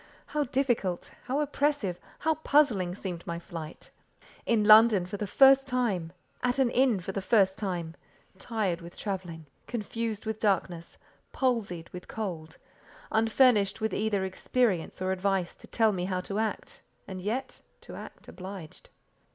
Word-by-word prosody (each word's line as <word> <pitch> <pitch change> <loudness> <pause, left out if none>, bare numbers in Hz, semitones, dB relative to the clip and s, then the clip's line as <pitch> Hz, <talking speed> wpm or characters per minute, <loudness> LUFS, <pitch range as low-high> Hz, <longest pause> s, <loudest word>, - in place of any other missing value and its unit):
How 300 -1 -1
difficult, 240 -9 -1
how 275 +4 0
oppressive, 285 -10 0 0.2
how 320 +1 +1
puzzling 265 - +2
seemed 180 -4 -5
my 170 - -3
flight! 165 -2 -8 0.6
In 225 -3 +3
London 215 -3 +7
for 195 +3 -6
the 210 - -3
first 270 +5 +6
time; 220 -10 -1 0.3
at 250 +1 +1
an 260 -3 +3
inn 250 -5 +3
for 185 - -5
the 195 - -3
first 190 -2 +3
time; 175 -5 -3 0.5
tired 195 -6 -2
with 170 +1 -11
travelling; 180 -6 -5 0.2
confused 230 -1 -3
with 220 0 -3
darkness; 180 -5 -1 0.4
palsied 220 - -1
with 180 0 -9
cold; 170 -7 -5 0.5
unfurnished 220 -2 +3
with 220 -3 -1
either 205 -2 0
experience 190 -2 0
or 185 - 0
advice 190 -1 0
to - - -12
tell 225 -2 +3
me 180 -3 -2
how 185 -1 -1
to 200 +3 -4
act, 220 -1 -3 0.3
and 185 -1 -6
yet—to 225 +8 -6
act - - -11
obliged. 185 -4 -9
205 Hz, 145 wpm, -29 LUFS, 180-235 Hz, 0.6 s, London